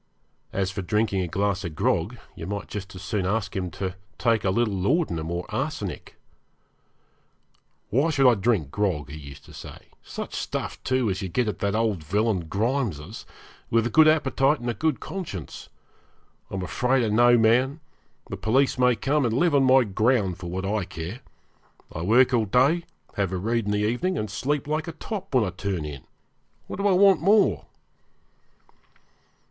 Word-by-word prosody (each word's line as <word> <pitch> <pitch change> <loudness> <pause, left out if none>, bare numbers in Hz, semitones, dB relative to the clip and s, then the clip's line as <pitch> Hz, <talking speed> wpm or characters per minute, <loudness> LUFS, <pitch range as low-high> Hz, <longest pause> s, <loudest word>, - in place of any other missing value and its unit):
As 95 -1 -1
for 95 - -4
drinking 100 +1 0
a 90 - -2
glass 100 +3 -1
of 85 -4 -5
grog, - - 0 0.2
you 80 - -7
might 100 +1 -4
just 95 -2 -7
as 90 - -9
soon 100 -2 -1
ask 100 -1 -1
him 90 -2 -2
to 95 +2 -4 0.2
take 115 -2 +2
a 95 - +1
little 110 +2 +1
laudanum 95 - 0
or 85 +1 -3
arsenic. - - -4 1.8
'Why 140 +9 +2
should 140 -4 +4
I 125 - +7
drink 100 - 0
grog,' 90 -9 -1
he 75 - -7
used 70 -2 -11
to - - -14
say - - -11
'such - - -7
stuff, - - -4
too, 130 -2 +1
as 95 +2 -3
you 95 - -4
get 120 +6 0
at 105 - -3
that 100 0 0
old 110 -7 0
villain 100 +1 0
Grimes's 105 - -2 0.4
with 115 0 +2
a 120 - -1
good 155 +4 +6
appetite 150 -2 +3
and 120 0 -2
a - - -4
good 150 +6 0
conscience? 150 - -7 0.8
I'm 95 -1 -4
afraid 125 +6 +1
of 110 - 0
no 120 +2 +5
man; 125 +6 +3 0.5
the - - -6
police 130 +4 +1
may 125 -1 +4
come 140 +4 +1
and 115 -1 0
live 170 +2 +3
on 140 -2 +4
my 130 0 +6
ground 105 -3 +1
for 90 -2 -6
what 95 +2 -3
I 105 0 0
care. 85 +7 -7 0.7
I 80 - -5
work 120 +8 +4
all 115 -3 +3
day, 135 - +3 0.3
have 100 -3 0
a 95 - -2
read 115 +4 -1
in 105 - -1
the 105 0 +1
evening, 180 +12 -1
and 105 - -3
sleep 145 +1 -1
like 155 +2 -1
a 165 - -5
top 195 -1 -6
when 125 - +5
I 95 - -2
turn 95 -4 -3
in. 70 -3 -8 0.6
What - - -7
do 200 +1 +1
I - - +4
want 190 -3 +5
more?' 205 +4 +3
110 Hz, 185 wpm, -25 LUFS, 95-130 Hz, 1.8 s, I